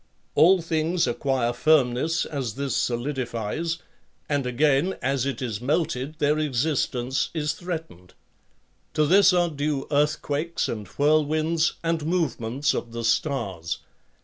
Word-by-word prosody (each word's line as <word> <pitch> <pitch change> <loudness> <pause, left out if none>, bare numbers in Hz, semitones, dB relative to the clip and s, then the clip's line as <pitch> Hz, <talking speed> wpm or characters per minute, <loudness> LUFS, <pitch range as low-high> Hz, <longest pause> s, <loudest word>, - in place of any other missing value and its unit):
All 180 +1 +5
things 165 +2 +1
acquire 125 -1 0
firmness 150 +3 +2
as 130 -7 -4
this 135 -2 -2
solidifies, 125 +4 -2 0.5
and 145 -3 0
again 145 +7 +2
as 135 -1 0
it 135 -1 -3
is 110 -3 -3
melted 145 0 -1
their 150 +1 +2
existence 130 -2 0
is 150 -1 0
threatened; 160 - -7 0.8
to 155 - +3
this 195 +6 +6
are 175 -2 +2
due 145 -1 -2
earthquakes 150 +2 0
and 105 -4 -5
whirlwinds 155 - +2
and 165 -2 0
movements 145 -6 0
of 115 - -4
the 115 0 -4
stars. 115 - -1
145 Hz, 120 wpm, -25 LUFS, 125-160 Hz, 0.8 s, this